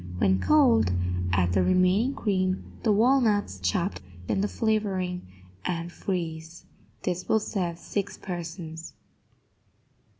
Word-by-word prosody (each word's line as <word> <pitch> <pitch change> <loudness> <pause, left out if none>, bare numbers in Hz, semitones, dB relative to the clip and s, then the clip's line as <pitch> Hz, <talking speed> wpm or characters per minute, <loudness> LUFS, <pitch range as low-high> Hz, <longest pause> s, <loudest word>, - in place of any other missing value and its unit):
When 95 0 +3
cold, 250 - +4 0.4
add 90 -1 +2
the 95 - +3
remaining 185 - +3
cream, 185 -3 0 0.2
the 220 - +2
walnuts, 220 -1 +3
chopped, 195 0 -1 0.3
and 195 - +1
the - - +2
flavoring, 195 - -1 0.4
and 170 -1 -3
freeze. 165 -3 -4 0.4
This 180 0 -3
will 220 - +4
serve 180 -5 -2
six 200 +3 -4
persons. 165 -3 -7
185 Hz, 110 wpm, -27 LUFS, 170-210 Hz, 0.4 s, cold